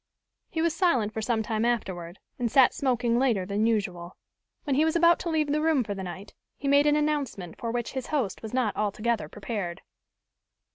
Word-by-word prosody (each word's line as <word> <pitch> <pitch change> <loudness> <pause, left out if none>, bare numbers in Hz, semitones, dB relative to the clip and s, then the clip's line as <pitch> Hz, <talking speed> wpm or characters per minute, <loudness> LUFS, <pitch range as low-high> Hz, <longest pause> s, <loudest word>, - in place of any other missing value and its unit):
He 320 -2 -1
was 335 -1 +1
silent 255 - +2
for 220 - -3
some 220 0 0
time 220 0 -1
afterward, 190 -7 -2 0.2
and 235 -2 -1
sat 260 -1 +6
smoking 245 -5 +1
later 235 -8 +1
than 205 +3 0
usual. 185 -6 -2 0.5
When 280 -3 0
he 295 - +4
was 320 +1 +1
about 340 0 +5
to 345 - -3
leave 310 -3 +1
the 305 +1 +1
room 310 -5 +3
for 205 - -4
the 195 - -6
night, 190 +2 -8 0.2
he 280 - -4
made 285 +1 +5
an 295 - +4
announcement 285 - -1
for 235 -3 -3
which 240 0 -2
his 260 -2 -4
host 265 -11 -1
was 220 - -7
not 250 -5 0
altogether 215 +2 -1
prepared. 195 -4 -5
235 Hz, 200 wpm, -27 LUFS, 205-290 Hz, 0.5 s, sat